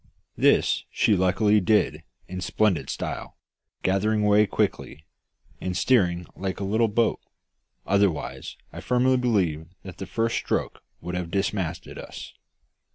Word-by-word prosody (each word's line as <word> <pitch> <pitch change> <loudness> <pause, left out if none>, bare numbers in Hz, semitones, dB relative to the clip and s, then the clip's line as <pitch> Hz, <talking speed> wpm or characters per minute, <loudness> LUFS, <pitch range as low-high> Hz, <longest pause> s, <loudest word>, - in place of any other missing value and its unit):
This - - +3
she 105 - +2
luckily 95 +3 +3
did 90 -6 +2 0.3
in 95 0 -6
splendid 95 -1 +1
style, - - -5 0.5
gathering 105 +3 +1
way 105 0 +5
quickly, 80 -4 -2 0.5
and 90 -1 -3
steering 90 -6 +2
like 95 0 -4
a - - -3
little 110 +4 +2
boat, 110 +2 +1 0.7
otherwise 100 -7 0 0.2
I - - -7
firmly 130 +1 +2
believe 95 -11 0 0.2
that 95 -2 -9
the 95 - -5
first 115 0 0
stroke - - -2 0.2
would 90 - -5
have 90 -1 -3
dismasted 95 -3 -2
us. - - -9
100 Hz, 130 wpm, -25 LUFS, 90-110 Hz, 0.7 s, way